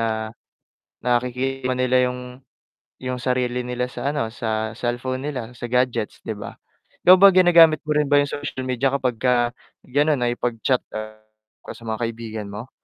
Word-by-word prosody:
na 110 -1 -2 0.7
nakikita 125 +2 0
nila 130 0 +2
yung 125 0 -6 0.8
yung 130 -1 -3
sarili 125 0 0
nila 125 0 -2
sa 125 +2 -3
ano, 115 -6 -2
sa 110 -2 -2
cellphone 125 +3 -3
nila 125 -5 -5
sa 120 0 -7
gadgets 125 -3 -1
'di - - -3
ba. 105 - -8 0.5
Ikaw 185 - +11
ba 200 - +10
ginagamit 170 -4 +6
mo 150 - +1
rin 150 -1 +1
ba 145 - +6
yung 145 - +1
social 145 -3 -5
media 130 +1 +1
kapag 130 -3 0
ka 125 -1 +3 0.5
ganun 145 +2 +2
nakipag-chat 120 +1 0 0.9
sa - - -12
mga 110 +1 -3
kaibigan 110 -2 -5
mo? 110 +6 -8
125 Hz, 155 wpm, -22 LUFS, 115-135 Hz, 0.9 s, Ikaw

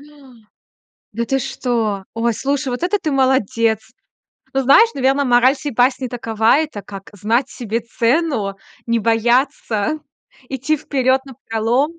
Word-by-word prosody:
А! - - -15 1.1
Да 235 +2 -2
ты 270 +3 0
что? 225 -6 -2
Ой, 230 0 0
слушай, 275 +3 -2
вот 245 +7 -4
это 410 +3 +1
ты 305 - -2
молодец! 235 -5 +2 0.7
Но 270 0 +1
знаешь, 445 - +6
наверное, 275 +1 +2
мораль 250 +2 +4
сей 290 -1 -5
басни 255 +2 +2
такова, 230 +1 +1
это 305 -9 -3
как 195 -1 -10
знать 230 +6 0
себе 230 -2 -3
цену, 230 -3 0 0.3
не 235 0 +1
бояться, 235 +3 +1 0.5
идти 270 +4 -1
вперёд 265 -2 0
напролом. 255 +5 -1
250 Hz, 135 wpm, -19 LUFS, 225-275 Hz, 1.1 s, знаешь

